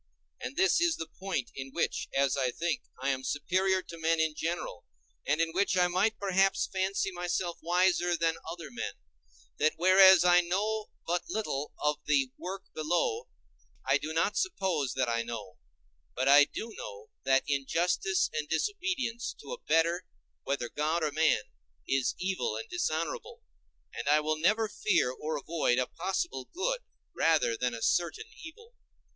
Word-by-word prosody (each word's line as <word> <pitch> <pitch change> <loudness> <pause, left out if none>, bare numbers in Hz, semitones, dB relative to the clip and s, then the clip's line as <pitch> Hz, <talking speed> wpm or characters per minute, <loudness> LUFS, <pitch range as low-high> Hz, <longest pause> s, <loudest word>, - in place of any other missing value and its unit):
And 130 - -6
this 190 - +4
is 340 -1 +3
the 160 - -5
point 185 -10 -2
in 135 0 -6
which, - - -1
as 135 -1 +2
I 130 -2 +1
think, 160 +3 -2 0.2
I 135 - +1
am 130 -1 -1
superior 185 +7 +1
to 170 - -10
men 165 0 +2
in 160 -1 +2
general, 165 - -4 0.4
and 150 +2 +2
in 165 0 +1
which 190 0 +1
I 180 0 +5
might 205 +5 +1
perhaps 195 -1 +2
fancy 195 0 -1
myself 175 -1 -2
wiser 175 0 +2
than 165 -1 +1 0.2
other 165 -4 -8
men—that 65 - -4
whereas 185 +1 +7
I 175 0 +6
know 210 +5 -1 0.2
but 175 +1 -1
little 150 -10 -3
of 150 0 0
the 135 -3 +2
world 190 +2 -6
below, 175 - 0 0.6
I - - +3
do 155 - -5
not 165 +6 +1
suppose 185 - 0
that 130 -1 +1
I 115 0 0
know: 115 -5 -7 0.6
but 130 +1 0
I 145 +1 +8
do 225 +8 -7
know 100 +1 -9
that 135 0 +3
injustice 175 +7 +1
and 150 -1 -3
disobedience 270 - -2
to - - -7
a - - -8
better, 170 +2 +2 0.3
whether 140 -3 -2
God 155 +5 -1
or 150 - +1
man, 155 -7 +2 0.4
is 135 -1 +1
evil 190 - -1
and 445 - -6
dishonorable, 470 +6 -3 0.5
and - - -3
I 150 +1 +6
will 155 0 -1
never 215 +7 +3
fear 210 -11 +1
or 155 +4 -4
avoid 150 -4 0
a 125 - +2
possible 165 -5 -3
good - - -1 0.4
rather 160 -8 +3
than 125 0 -1
a 115 - -6
certain 305 - +1 0.2
evil. 455 +9 -12
170 Hz, 165 wpm, -30 LUFS, 140-195 Hz, 0.6 s, I